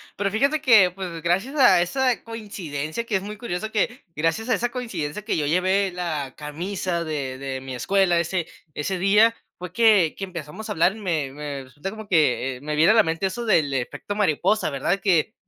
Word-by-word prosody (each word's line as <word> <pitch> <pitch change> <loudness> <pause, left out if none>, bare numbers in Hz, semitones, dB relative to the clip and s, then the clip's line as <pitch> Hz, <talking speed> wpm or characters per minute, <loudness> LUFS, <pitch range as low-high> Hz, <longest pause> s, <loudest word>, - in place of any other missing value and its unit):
Pero 200 0 -1
fíjate 280 +8 +2
que, 220 -9 +6
pues 180 -2 -7
gracias 190 - 0
a 245 -11 +6
esa 255 +7 0
coincidencia, 195 -6 -5
que 225 - -2
es 190 - +1
muy 210 +2 -7
curioso 220 -2 -4
que, 225 +5 -1
gracias 165 +10 -1
a 250 - +4
esa 240 +4 -1
coincidencia 210 - -4
que 215 - -1
yo 150 - 0
llevé 185 +5 +2
la 155 -7 -3
camisa 170 +3 -3
de 140 -5 -4
de 135 -1 -5
mi 130 -1 -6
escuela 180 +6 +2
ese 170 0 -1 0.3
ese 185 +7 -2
día, 210 +5 +4 0.2
fue 180 -1 -7
que 205 -5 +4
que - - -6
empezamos 175 +2 -7
a - - -5
hablar, 175 +5 +2
y 220 - -10
me 160 -8 -2
me 145 -1 -6
resulta 145 +9 -7
como 220 0 -9
que, 145 -7 +2
eh, - - -16
me 150 +1 -3
viene 160 +6 +5
a - - +2
la 225 - +6
mente 165 +4 -1
eso 235 +6 -5
del 160 -10 +3
efecto 130 +10 -4
mariposa, 200 0 +1
¿verdad? 155 +8 0
Que 190 0 +2
180 Hz, 205 wpm, -23 LUFS, 155-210 Hz, 0.3 s, que